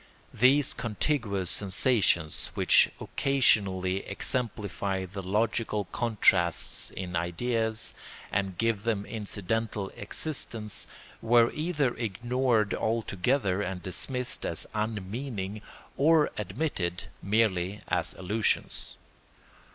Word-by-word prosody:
These 130 +4 +4
contiguous 105 - -1
sensations, 95 -5 +2
which - - +5
occasionally 95 -9 +2
exemplify 100 -3 -2
the 95 +2 -7
logical 105 +2 0
contrasts 95 -7 +2
in 90 -1 -5
ideas 110 +6 -1 0.4
and 95 -3 -1
give 115 -2 +1
them 105 -2 -1
incidental 105 -1 -2
existence, 110 -3 -3 0.3
were 120 0 +5
either 150 -5 0
ignored 120 0 0
altogether 110 -1 0
and 90 -3 -4
dismissed 125 +8 0
as 85 - -1
unmeaning, 105 0 -3 0.3
or 155 +1 +4
admitted 95 - -2 0.2
merely 100 -2 +1
as - - 0
illusions. 100 +3 -1
105 Hz, 90 wpm, -28 LUFS, 95-120 Hz, 0.4 s, which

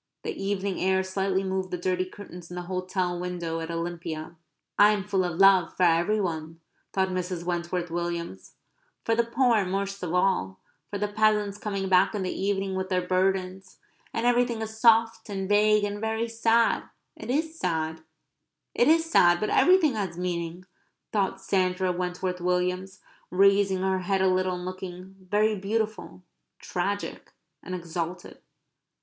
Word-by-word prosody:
The - - -2
evening 195 -1 -2
air 190 0 +2
slightly 190 0 -1
moved 190 -1 -2
the 180 - -3
dirty 185 +1 0
curtains 180 -3 -11
in 175 - -8
the 180 - -4
hotel 185 0 -2
window 175 -2 -3
at 165 0 -5
Olympia. 165 -1 -5 0.4
"I 210 +1 +7
am 205 -2 -2
full 190 -1 0
of 175 -2 -3
love 195 -3 +5
for 185 - +2
every 175 +5 +3
one," 165 -3 -3 0.3
thought 190 -1 +1
Mrs. 180 -1 -3
Wentworth 175 0 -2
Williams, 170 0 -4 0.2
" - - -43
for 230 - +2
the 235 +1 +3
poor 235 -2 +2
most 195 +1 -3
of 180 0 -2
all 95 - +1 0.3
for 205 - -3
the 210 +1 -1
peasants 210 -1 +1
coming 200 -2 -3
back 185 +3 +4
in 200 - -2
the 185 - -2
evening 195 0 -1
with 190 0 -3
their 180 -1 0
burdens. 185 0 -1 0.3
And 230 - -2
everything 240 -2 +2
is 220 0 -7
soft 225 0 +4
and 195 -1 -3
vague 210 +1 +4
and 205 0 -3
very 220 +1 -1
sad. 230 0 +2 0.3
It - - -9
is 320 +4 -1
sad, 160 -2 -2 0.7
it 240 - +3
is 325 +1 +4
sad. 175 - +4
But 215 - -1
everything 355 -6 +5
has 195 -6 -3
meaning," 175 0 -3 0.5
thought 200 -3 0
Sandra 185 -1 0
Wentworth 180 0 -3
Williams, 180 +1 -1 0.3
raising 195 0 +3
her 190 0 +1
head 190 +1 0
a - - +4
little 185 0 +1
and 180 0 -6
looking 185 +1 -8
very 215 +2 +2
beautiful, 210 -1 -3 0.4
tragic, 200 +3 -4 0.3
and 185 - -5
exalted. 175 0 -5
190 Hz, 165 wpm, -27 LUFS, 180-205 Hz, 0.7 s, I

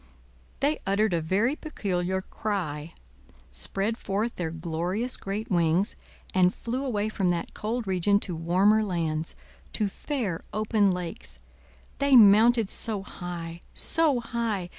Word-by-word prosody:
They 290 +2 +2
uttered 200 0 +2
a 170 - +1
very 205 - +1
peculiar 190 - -2
cry, 170 -7 -4 0.6
spread 195 - +1
forth 210 +4 -2
their 175 -3 -2
glorious 170 +8 -2
great 205 +3 -4
wings, 170 +2 +2 0.4
and 180 -1 +4
flew 250 +3 -3
away 215 -6 -1
from 195 -4 0
that 175 -1 -2
cold 225 +2 -3
region 195 +1 +2
to 180 - -4
warmer 190 +7 +3
lands, 165 -5 -2 0.4
to 210 - 0
fair 205 - -3
open 215 -1 +2
lakes. 180 +2 -4 0.6
They 280 -1 +4
mounted 225 +1 +7
so 210 -4 -1
high, 170 -3 -7
so 315 -6 +2
high! 230 -6 -2
200 Hz, 130 wpm, -27 LUFS, 175-225 Hz, 0.6 s, mounted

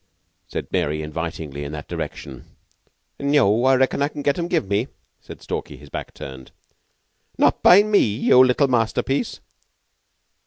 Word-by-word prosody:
said - - -5
Mary 75 -4 -1
invitingly, 75 -2 -5
in 70 - -6
that 75 - -7
direction. 65 -3 -7 0.7
"Neu! 135 -3 +3
Reckon 130 +1 +1
I 140 - +3
can 145 -1 -8
get 140 +3 +1
'em 170 - -2
give 165 - 0
me," 100 +5 0 0.3
said - - -13
Stalky, - - -5
his 75 - -15
back - - -7
turned. 65 -1 -9 0.9
"Not - - +2
by 195 +3 +7
me 210 -1 +3
yeou 115 +4 +4
little 130 +2 +3
masterpiece!" 125 +2 -1
115 Hz, 145 wpm, -22 LUFS, -, 0.9 s, by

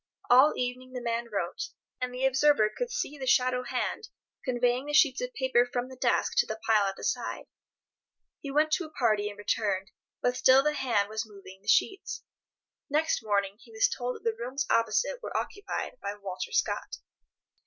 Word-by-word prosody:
All 260 +5 +7
evening 255 +1 -3
the 250 - -3
man 235 0 -2
wrote, 185 -4 -2 0.4
and 250 0 -1
the 250 +1 -1
observer 265 -4 +4
could - - -2
see 480 - -3
the 260 - -4
shadow 250 0 +3
hand - - -3 0.3
conveying 250 +1 +1
the 295 - -4
sheets 285 -4 +5
of - - -3
paper 260 -2 +3
from 245 +1 -3
the 260 - -10
desk 250 -1 +1
to - - +4
the 220 0 -5
pile 215 -3 +4
at 195 - -3
the - - -11
side. - - -2 0.9
He 280 - -7
went 305 +3 +2
to 340 +2 +1
a - - -10
party 215 -8 +1
and 205 - -10
returned, 205 -2 -1 0.3
but 245 0 +1
still 260 +2 +6
the 300 +1 +2
hand 240 -8 +1
was 220 +1 -4
moving 195 -2 -13
the 205 - -23
sheets. 385 - +1 0.7
Next 305 -3 +1
morning 200 -2 0
he - - -17
was 445 +3 +3
told 250 - -3
that - - -12
the 225 -1 0
rooms 255 +5 -3
opposite 230 - +1
were - - -3
occupied 410 +4 -4
by 200 - -4
Walter 195 -3 -6
Scott. - - -1
250 Hz, 190 wpm, -29 LUFS, 215-280 Hz, 0.9 s, All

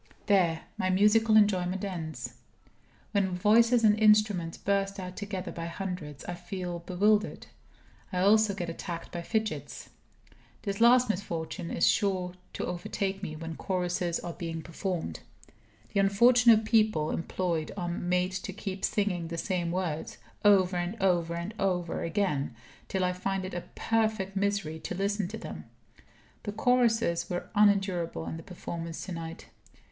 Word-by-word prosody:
There, 175 -6 +3 0.2
my 185 - +1
musical 215 +3 +5
enjoyment 190 -2 +2
ends. 165 -5 -5 0.8
When 195 -3 +1
voices 230 +5 +4
and 210 -1 +5
instruments 210 -6 +4
burst 195 0 0
out 180 -1 -6
together 200 -3 -4
by 165 0 -5
hundreds, 170 -5 -5
I 175 - -4
feel 175 0 -5
bewildered. 205 +5 +1 0.7
I 185 - -3
also 210 +1 +4
get 175 -3 -3
attacked 165 0 -6
by 175 - -4
fidgets. 220 +4 -3 0.7
This 200 0 -3
last 245 +1 +6
misfortune 175 -3 -3
is - - +2
sure 185 -3 +1 0.2
to - - -3
overtake 190 +2 -3
me 155 -6 -5
when 165 +1 -6
choruses 180 -2 -1
are 170 - -5
being 165 -1 -5
performed. 180 0 -4 0.7
The 200 - +2
unfortunate 225 +3 +5
people 215 -9 +3
employed 170 -1 -2
are 175 -2 -2
made 180 +1 0
to 190 +1 -4
keep 195 -1 -6
singing 185 -5 0
the 170 0 -5
same 175 -1 -1
words, 170 -3 -3 0.3
over 190 -3 +5
and 175 +5 -3
over 175 -3 +2
and 170 +5 -4
over 180 -3 0
again, 165 - -1 0.3
till 190 -1 -1
I 180 0 +1
find 190 +1 -2
it 185 - -6
a 175 - -4
perfect 215 -4 0
misery 200 -5 -1
to 180 - -5
listen 200 0 0
to 220 +4 -6
them. - - -8 0.8
The 205 - -5
choruses 230 -5 +2
were 175 0 -4
unendurable 195 -6 +2
in 160 - -4
the - - -8
performance 170 -2 -6
to 190 - -7
night. 165 -1 -6
185 Hz, 150 wpm, -29 LUFS, 175-205 Hz, 0.8 s, last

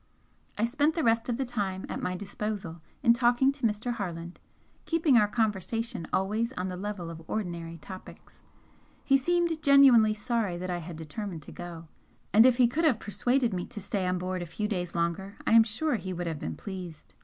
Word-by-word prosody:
I 215 - +2
spent 290 +6 +1
the 325 - 0
rest 230 0 +2
of 235 - 0
the 270 - -1
time 200 -6 -3
at - - -4
my 180 - -2
disposal 195 -4 -5 0.2
in 235 -3 +7
talking 245 +2 +3
to 275 -4 0
Mr. 220 +3 -2
Harland, 175 -5 -5 0.5
keeping 325 -5 +3
our 210 -3 +6
conversation 220 -2 -2
always 215 +5 0
on 185 -3 -3
the 180 - -4
level 185 -3 -5
of 165 0 -9
ordinary 170 -5 -4
topics. 185 +4 -12 0.6
He 275 - +4
seemed 335 +3 +1
genuinely 265 -7 +6
sorry 215 -4 -1
that 180 +1 -4
I 175 - -2
had 170 0 -8
determined 165 +2 -6
to - - -11
go, 170 -2 -8 0.5
and 220 +4 +8
if 250 -2 +3
he 250 -2 +6
could 305 +8 -1
have 260 -9 +3
persuaded 235 +4 0
me 180 -1 -3
to 235 - -8
stay 190 -1 -2
on 180 0 +1
board 185 0 -3
a 175 - -5
few 210 +6 -3
days 180 -5 -3
longer 170 +4 -1
I - - +1
am 225 0 +9
sure 235 +6 0
he 185 -2 -5
would 175 0 -4
have 160 -3 -3
been - - -4
pleased. 180 -5 -8
210 Hz, 200 wpm, -28 LUFS, 180-240 Hz, 0.6 s, am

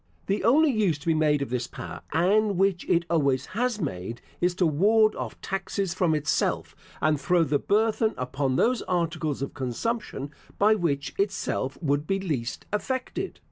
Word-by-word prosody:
The 200 0 -1
only 285 +7 +5
use 205 - +1
to 145 - -15
be 165 - +3
made 150 -2 +2
of 130 - -7
this 125 -1 -1
power - - -8
(and 200 +5 +2
which 195 -1 +1
it 170 0 +3
always 140 -6 +1
has 240 +1 0
made), 115 - -4 0.2
is 175 0 +2
to 185 - +2
ward 215 +8 +4
off - - -6
taxes 195 -1 -2
from 175 -3 +2
itself, 150 -1 0 0.3
and 150 -2 +2
throw 175 -2 +3
the 145 -2 +1
burthen 220 +1 +1
upon 130 +1 -1
those 245 - +2
articles 160 -5 -1
of 140 - -5
consumption 140 - -3 0.3
by 210 +2 +5
which 155 -8 -1
itself 190 -8 -1
would 145 0 0
be 195 0 +1
least 145 -11 -3
affected. 260 - -3
170 Hz, 170 wpm, -26 LUFS, 145-210 Hz, 0.3 s, only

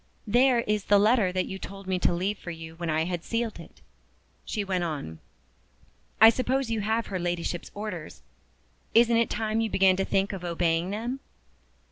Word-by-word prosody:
"There 245 +2 +4
is 210 -3 -1
the 205 - +5
letter 210 -2 +3
that 185 0 0
you 190 - -6
told 195 0 -9
me 185 -1 -1
to - - +2
leave 190 +4 -1
for - - -8
you 160 -1 -8
when 170 -1 -3
I 155 0 +1
had 175 0 -3
sealed 230 -4 -2
it," 165 - -14 0.6
she 210 - -3
went 185 -2 -1
on. 140 - -5 1.0
"I 220 +1 +9
suppose 255 0 -1
you 225 -2 0
have 220 +2 0
her 190 -2 -4
Ladyship's 175 0 -3
orders. 200 -7 -6 0.7
Isn't 230 0 +5
it 230 -1 +2
time 220 0 -1
you 225 - 0
began 190 -2 +4
to 195 - +1
think 195 +1 0
of 190 -2 -6
obeying 170 0 0
them?" 235 +6 -3
195 Hz, 185 wpm, -27 LUFS, 175-225 Hz, 1.0 s, I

